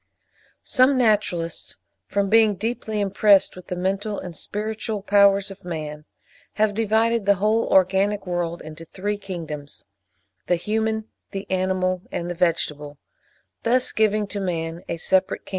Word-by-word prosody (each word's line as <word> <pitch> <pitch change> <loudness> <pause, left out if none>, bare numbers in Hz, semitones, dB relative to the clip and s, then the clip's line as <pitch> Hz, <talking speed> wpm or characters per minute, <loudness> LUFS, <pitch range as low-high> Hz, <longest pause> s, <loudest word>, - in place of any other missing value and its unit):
Some 260 +1 +4
naturalists, 205 -8 0 0.3
from 200 0 0
being 215 0 +4
deeply 220 0 -3
impressed 200 0 +4
with 185 - -12
the 180 - -3
mental 195 +3 -2
and 175 -2 -7
spiritual 215 +3 -4
powers 200 -1 +4
of 195 0 -12
man, 155 -3 -6 0.5
have 215 -1 +1
divided 225 0 +1
the 200 - +6
whole 215 +4 +1
organic 195 +2 +3
world 175 -1 -2
into 155 +1 -9
three 205 +5 -4
kingdoms, 160 -7 -7 0.6
the 175 - +3
Human, 220 +4 -1 0.2
the 195 +1 -5
Animal, 185 -1 0
and 175 0 -3
the - - -2
Vegetable, 150 -4 -1 0.6
thus 250 +2 +2
giving 215 -1 +2
to 200 0 -5
man 165 -3 -3
a 170 - -2
separate 190 +3 +1
kingdom. - - -13
195 Hz, 140 wpm, -23 LUFS, 175-215 Hz, 0.6 s, the